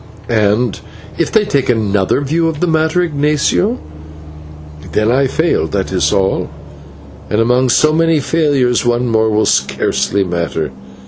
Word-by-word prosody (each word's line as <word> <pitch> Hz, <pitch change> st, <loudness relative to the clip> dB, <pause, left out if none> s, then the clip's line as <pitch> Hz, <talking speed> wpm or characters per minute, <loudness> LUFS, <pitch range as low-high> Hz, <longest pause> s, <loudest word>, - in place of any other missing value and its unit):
"And 110 Hz, 0 st, +1 dB, 0.4 s
if -, -, 0 dB
they 220 Hz, -2 st, +3 dB
take 140 Hz, -10 st, -1 dB
another 105 Hz, 0 st, +1 dB
view 160 Hz, +4 st, 0 dB
of 160 Hz, -2 st, -3 dB
the 180 Hz, -, +1 dB
matter, 160 Hz, +1 st, +1 dB
Ignatio?" 150 Hz, -, 0 dB, 1.2 s
"Then 110 Hz, +2 st, +1 dB
I 135 Hz, +2 st, +2 dB
fail, 160 Hz, -, 0 dB
that 95 Hz, +2 st, -3 dB
is 90 Hz, -2 st, +1 dB
all, 95 Hz, 0 st, 0 dB, 0.8 s
and 105 Hz, -, 0 dB
among 125 Hz, +3 st, +2 dB
so 155 Hz, +5 st, +3 dB
many 165 Hz, -1 st, +2 dB
failures 140 Hz, -5 st, +1 dB
one 120 Hz, +1 st, 0 dB
more 110 Hz, -1 st, +1 dB
will 110 Hz, 0 st, +1 dB
scarcely 100 Hz, 0 st, 0 dB
matter. 85 Hz, -4 st, -3 dB
125 Hz, 140 wpm, -15 LUFS, 105-155 Hz, 1.2 s, they